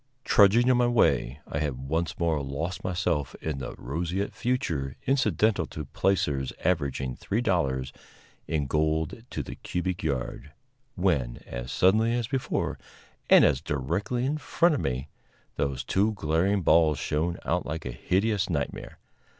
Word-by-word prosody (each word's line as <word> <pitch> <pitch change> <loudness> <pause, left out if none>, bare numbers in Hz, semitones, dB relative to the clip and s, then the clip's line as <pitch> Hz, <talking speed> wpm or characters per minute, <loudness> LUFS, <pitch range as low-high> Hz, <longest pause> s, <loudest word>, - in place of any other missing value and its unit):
Trudging 110 +4 +5
on 125 - +4
my 120 0 +3
way, 75 - +2
I 70 - -3
had 65 -3 -3
once 80 +3 -1
more 80 -4 +1
lost 80 +8 -4
myself 85 -6 -1
in 75 -4 -3
the 65 - -6
roseate 85 +9 -3
future 80 - -1
incidental 110 - +2
to 75 - -6
placers 75 -7 0
averaging 70 -7 0
three 105 - -2
dollars 70 - 0 0.5
in 75 -3 0
gold 80 - 0
to - - -3
the - - -7
cubic 90 0 -3
yard, 70 -1 -3 0.4
when, 80 -11 0
as - - -6
suddenly 110 - +3
as 120 -1 0
before, 135 0 -2 0.5
and - - +8
as 70 -2 +2
directly 85 - -1
in 150 +3 -1
front 170 +3 +2
of 145 - -1
me, 65 +2 -2 0.5
those 70 -2 -1
two 105 +3 +1
glaring 90 +3 +1
balls 80 -2 +4
shone 80 +6 -1
out 90 +1 0
like 80 +2 -4
a 65 - -3
hideous 100 - 0
nightmare. 70 -5 -3
80 Hz, 150 wpm, -27 LUFS, 70-100 Hz, 0.5 s, and